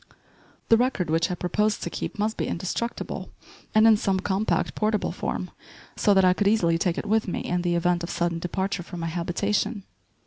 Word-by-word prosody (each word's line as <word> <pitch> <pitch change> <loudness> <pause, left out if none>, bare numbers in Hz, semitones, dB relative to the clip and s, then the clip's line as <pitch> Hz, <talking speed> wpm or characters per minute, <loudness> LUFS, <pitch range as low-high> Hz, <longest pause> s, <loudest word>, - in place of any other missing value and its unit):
The 225 - +7
record 225 -9 0
which 165 +1 +2
I 180 - -1
proposed 210 +5 0
to - - -2
keep - - -5
must 215 +2 0
be - - -2
indestructible, 190 +7 -3 0.5
and 215 +1 +6
in 225 -1 +7
some 195 -2 0
compact, 195 +2 0
portable 215 -1 0
form - - -4 0.4
so 205 -2 +3
that 190 -1 +5
I 180 - +5
could 200 +2 0
easily 170 -6 +3
take 175 -1 0
it - - -3
with 220 +1 +1
me 180 - -2
in 180 0 -1
the 175 -1 0
event 175 0 +1
of 170 - -4
sudden 170 -1 -1
departure 190 +2 -2
from 175 0 -8
my - - -2
habitation. 200 +5 -1
190 Hz, 200 wpm, -25 LUFS, 175-215 Hz, 0.5 s, The